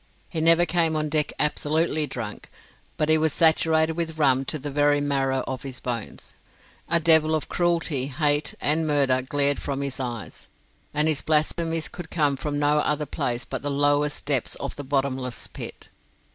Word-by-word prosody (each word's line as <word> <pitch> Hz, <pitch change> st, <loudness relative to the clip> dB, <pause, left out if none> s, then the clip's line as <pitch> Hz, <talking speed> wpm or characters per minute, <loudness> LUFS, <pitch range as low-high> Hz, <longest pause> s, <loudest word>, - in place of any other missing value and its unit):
He 160 Hz, -, -3 dB
never 165 Hz, +2 st, +5 dB
came 165 Hz, -1 st, +1 dB
on 155 Hz, 0 st, -1 dB
deck 150 Hz, 0 st, +1 dB
absolutely 150 Hz, +1 st, 0 dB
drunk, 115 Hz, -5 st, -7 dB, 0.5 s
but 150 Hz, -, +1 dB
he 160 Hz, 0 st, +4 dB
was 155 Hz, -2 st, +1 dB
saturated 160 Hz, 0 st, +4 dB
with 160 Hz, -1 st, -4 dB
rum 135 Hz, -3 st, +3 dB
to 155 Hz, -, -3 dB
the 145 Hz, 0 st, -6 dB
very 145 Hz, +1 st, +2 dB
marrow 135 Hz, -2 st, 0 dB
of 130 Hz, -1 st, -5 dB
his 130 Hz, -3 st, -6 dB
bones. 120 Hz, -4 st, -5 dB, 0.6 s
A 170 Hz, -, +5 dB
devil 160 Hz, -1 st, +4 dB
of 155 Hz, -, -3 dB
cruelty, 165 Hz, -6 st, 0 dB
hate, 145 Hz, +1 st, 0 dB
and 155 Hz, +2 st, +1 dB
murder 135 Hz, -3 st, +2 dB
glared 140 Hz, +2 st, +2 dB
from 140 Hz, -1 st, -3 dB
his 140 Hz, -1 st, -4 dB
eyes, 120 Hz, -5 st, -6 dB, 0.4 s
and 150 Hz, +1 st, +1 dB
his 155 Hz, -3 st, +1 dB
blasphemies 160 Hz, +1 st, 0 dB
could 175 Hz, -3 st, -9 dB
come 145 Hz, -4 st, +1 dB
from 145 Hz, +2 st, -4 dB
no 145 Hz, +1 st, +2 dB
other 150 Hz, 0 st, 0 dB
place 120 Hz, -3 st, -3 dB
but -, -, -5 dB
the 145 Hz, -, -3 dB
lowest 145 Hz, +1 st, +1 dB
depths 140 Hz, -5 st, 0 dB
of 140 Hz, -, -6 dB
the 145 Hz, -, -6 dB
bottomless 135 Hz, -2 st, -2 dB
pit. -, -, -8 dB
145 Hz, 175 wpm, -24 LUFS, 135-160 Hz, 0.6 s, never